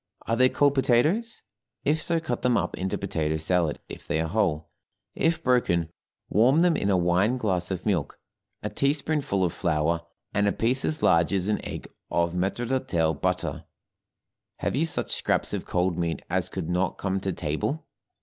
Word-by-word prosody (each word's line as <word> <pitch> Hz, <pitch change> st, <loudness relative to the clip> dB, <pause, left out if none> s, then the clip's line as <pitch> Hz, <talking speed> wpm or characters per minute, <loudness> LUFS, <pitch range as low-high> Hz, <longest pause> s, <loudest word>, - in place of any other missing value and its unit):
Are 115 Hz, -, +1 dB
there 130 Hz, +2 st, +5 dB
cold 145 Hz, +1 st, +3 dB
potatoes? 150 Hz, -, +2 dB, 0.4 s
If 155 Hz, +2 st, +2 dB
so 165 Hz, 0 st, +2 dB
cut 160 Hz, -, -3 dB
them 125 Hz, -1 st, +3 dB
up -, -, -1 dB
into 95 Hz, +1 st, -2 dB
potato 80 Hz, 0 st, -1 dB
salad, 80 Hz, 0 st, +1 dB
if -, -, -10 dB
they 80 Hz, -, 0 dB
are 80 Hz, -, 0 dB
whole; 80 Hz, -6 st, 0 dB, 0.4 s
if 165 Hz, +1 st, 0 dB
broken, 85 Hz, -10 st, +2 dB, 0.4 s
warm 130 Hz, +9 st, +4 dB
them 175 Hz, -2 st, +4 dB
in 100 Hz, -, 0 dB
a 95 Hz, -, +4 dB
wineglass 90 Hz, +1 st, +1 dB
of 95 Hz, -2 st, -4 dB
milk, 85 Hz, -9 st, 0 dB, 0.5 s
a -, -, -3 dB
teaspoonful 140 Hz, -7 st, 0 dB
of 85 Hz, -, 0 dB
flour, 85 Hz, -1 st, 0 dB, 0.3 s
and 105 Hz, 0 st, +2 dB
a -, -, +3 dB
piece 125 Hz, +4 st, +1 dB
as 155 Hz, -, -2 dB
large 85 Hz, -1 st, +4 dB
as 95 Hz, 0 st, 0 dB
an 105 Hz, -, 0 dB
egg -, -, -6 dB, 0.2 s
of 85 Hz, 0 st, +1 dB
maître 95 Hz, +7 st, -1 dB
d'hôtel 85 Hz, -, 0 dB
butter. -, -, -1 dB, 0.9 s
Have -, -, -2 dB
you 160 Hz, +4 st, +2 dB
such -, -, -2 dB
scraps -, -, 0 dB
of -, -, -3 dB
cold 90 Hz, -1 st, 0 dB
meat 85 Hz, -1 st, -2 dB
as 95 Hz, 0 st, +1 dB
could 90 Hz, -4 st, -4 dB
not 90 Hz, +2 st, 0 dB
come 95 Hz, 0 st, -1 dB
to 95 Hz, 0 st, -2 dB
table? 85 Hz, -, -2 dB
95 Hz, 180 wpm, -26 LUFS, 85-130 Hz, 0.9 s, there